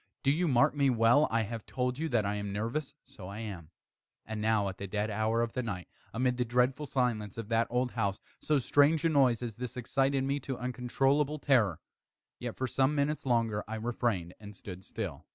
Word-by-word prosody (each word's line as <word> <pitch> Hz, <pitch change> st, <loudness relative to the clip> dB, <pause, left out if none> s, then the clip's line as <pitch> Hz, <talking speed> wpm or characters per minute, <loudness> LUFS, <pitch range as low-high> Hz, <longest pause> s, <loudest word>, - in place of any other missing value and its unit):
do 135 Hz, -, +4 dB
you 170 Hz, +4 st, +1 dB
mark 125 Hz, -3 st, +4 dB
me 140 Hz, -2 st, +3 dB
well 120 Hz, +4 st, +4 dB
I 115 Hz, 0 st, +1 dB
have 115 Hz, +1 st, -5 dB
told 125 Hz, +1 st, -2 dB
you 160 Hz, 0 st, -1 dB
that 115 Hz, -6 st, +2 dB
I 100 Hz, -, 0 dB
am 105 Hz, -1 st, -3 dB
nervous: 115 Hz, +8 st, -3 dB
so 90 Hz, -, -11 dB
I 100 Hz, +2 st, -7 dB
am. 95 Hz, -8 st, -7 dB, 0.6 s
And 110 Hz, -1 st, -4 dB
now 110 Hz, -2 st, +2 dB
at 95 Hz, -1 st, -6 dB
the 100 Hz, -, -4 dB
dead 105 Hz, +2 st, -1 dB
hour 110 Hz, +2 st, +1 dB
of 115 Hz, -, -3 dB
the 125 Hz, -, -1 dB
night, 95 Hz, -7 st, -5 dB, 0.2 s
amid 125 Hz, +1 st, 0 dB
the 125 Hz, -, +2 dB
dreadful 125 Hz, +4 st, +1 dB
silence 115 Hz, -6 st, -1 dB
of 115 Hz, -1 st, -6 dB
that 115 Hz, 0 st, +2 dB
old 125 Hz, +1 st, 0 dB
house, 100 Hz, -4 st, -1 dB, 0.2 s
so 150 Hz, -, +1 dB
strange 145 Hz, +4 st, +3 dB
a -, -, +5 dB
noise 130 Hz, -6 st, +3 dB
as 115 Hz, -2 st, -5 dB
this 125 Hz, 0 st, -5 dB
excited 135 Hz, +2 st, +1 dB
me 140 Hz, +1 st, 0 dB
to 135 Hz, -1 st, -5 dB
uncontrollable 135 Hz, +4 st, 0 dB
terror. 115 Hz, -, +2 dB, 0.6 s
Yet, -, -, -4 dB
for 130 Hz, -, -1 dB
some 135 Hz, +3 st, +1 dB
minutes 145 Hz, 0 st, 0 dB
longer 115 Hz, -4 st, +1 dB
I 110 Hz, -, -4 dB
refrained 110 Hz, -6 st, -1 dB
and 105 Hz, -1 st, -10 dB
stood 95 Hz, -2 st, -9 dB
still. 95 Hz, -9 st, -6 dB
120 Hz, 210 wpm, -31 LUFS, 105-135 Hz, 0.6 s, a